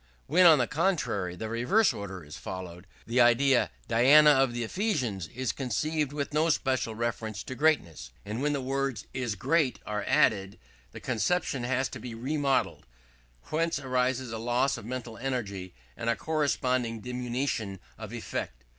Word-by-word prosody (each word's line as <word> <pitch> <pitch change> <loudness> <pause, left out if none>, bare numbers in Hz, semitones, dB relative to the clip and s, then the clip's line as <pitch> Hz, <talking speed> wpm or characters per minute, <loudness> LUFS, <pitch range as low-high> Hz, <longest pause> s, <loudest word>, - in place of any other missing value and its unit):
When, 180 +4 +6
on 160 -2 +8
the 125 - +2
contrary, 135 - -1
the 110 +5 -5
reverse 125 - +2
order 95 -3 -7
is 75 0 -10
followed, 90 0 -7 0.2
the 120 +2 +2
idea, 120 +2 +4 0.2
"Diana 140 +6 +7
of 135 -3 +3
the 120 0 -3
Ephesians" 125 - -1
is 130 +5 -3
conceived 145 +4 -1
with 145 0 -4
no 155 +2 +2
special 130 -7 0
reference 110 -2 -3
to - - -6
greatness; 130 - +1 0.2
and 110 +5 -4
when 145 +1 +1
the 140 - -1
words 135 -1 -2
"is 125 -5 -2
great" 140 - +1
are 105 -1 -3
added, 100 -2 +2 0.3
the - - -9
conception 130 +1 -1
has 130 +1 0
to - - -8
be 120 -2 -7
remodeled: 135 +3 -1 0.6
whence 165 0 +1
arises 130 -2 -1
a 115 - -4
loss 120 +4 +1
of - - -9
mental 120 -2 -6
energy 100 -9 -4 0.2
and 115 - -3
a 115 - +2
corresponding 130 -5 0
diminution 125 -5 -3 0.2
of - - -7
effect. - - -5
125 Hz, 160 wpm, -28 LUFS, 110-140 Hz, 0.6 s, on